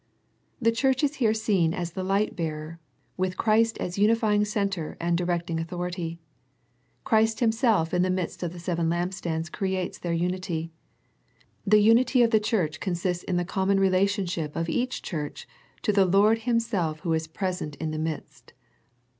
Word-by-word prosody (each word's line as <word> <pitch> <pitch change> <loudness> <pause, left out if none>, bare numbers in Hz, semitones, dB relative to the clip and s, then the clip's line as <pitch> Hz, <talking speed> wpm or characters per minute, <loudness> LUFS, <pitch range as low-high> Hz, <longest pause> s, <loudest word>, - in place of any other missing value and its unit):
The 230 -2 +3
Church 265 +3 +1
is 290 +1 +1
here 225 -4 +2
seen 190 -7 +1
as 175 -2 -3
the 190 - -4
Hght 195 +3 0
bearer, 160 0 -4 0.4
with 185 0 -1
Christ 225 0 +2
as 180 +2 -4
unifying 210 -1 +3
Centre 200 -6 -2
and 170 0 +1
directing 175 -1 -1
Authority. 175 0 -4 0.8
Christ 220 -1 +2
Himself 220 -7 +2
in 180 - +3
the 185 - +2
midst 185 -2 -2
of 175 -2 -2
the 180 - -10
seven 170 -1 -1
lamp, 175 +2 -1
stands 165 -3 -3
creates 190 +1 -3
their 175 - -3
unity. 170 -1 -2 1.0
The 210 +1 +6
unity 240 +3 +5
of 230 - +2
the 220 - +5
j 210 - -4
Church 160 -8 0
consists 180 -1 -2
in 180 - 0
the 175 - 0
common 195 +1 +1
relationship 185 -4 +1
of: 165 0 -2
each 255 +6 -1
church 150 -4 -5 0.4
to 210 - +2
the 195 -1 +5
Lord 205 +5 +4
Himself 200 -10 0
Who 165 -1 0
is 160 0 -1
present 180 -3 -3
in 160 0 -4
the 155 - -3
midst. 155 -1 -6
185 Hz, 170 wpm, -26 LUFS, 170-215 Hz, 1.0 s, The